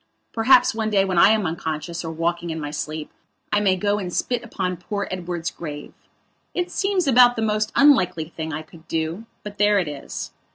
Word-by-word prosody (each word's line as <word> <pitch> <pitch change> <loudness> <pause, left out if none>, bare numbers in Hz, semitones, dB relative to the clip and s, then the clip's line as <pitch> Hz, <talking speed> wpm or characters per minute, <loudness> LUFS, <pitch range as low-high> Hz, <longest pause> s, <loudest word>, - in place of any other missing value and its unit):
Perhaps 240 +2 +5
one 220 -1 -1
day 195 -2 +3
when 185 -3 +1
I - - +8
am 215 -2 +2
unconscious 165 +1 -4
or 165 - -4
walking 170 +1 -2
in 160 0 -3
my 145 -1 -5
sleep 155 0 -5 0.4
I 210 - +4
may 195 -2 +3
go 205 +2 0
and 180 -3 -4
spit 245 +6 -1
upon 185 -6 -3
poor 200 +3 -4
Edward's 175 -2 -3
grave. 150 -3 -8 0.6
It 355 0 -1
seems 390 -3 0
about 245 -2 +6
the 225 - -1
most 215 0 0
unlikely 185 - +4
thing 160 -1 -5
I 155 +1 -4
could 160 +1 -17
do; 165 +7 -3 0.2
but 205 -1 -9
there 205 0 +4
it 180 -5 +1
is. 145 -2 -6
185 Hz, 200 wpm, -23 LUFS, 165-215 Hz, 0.6 s, I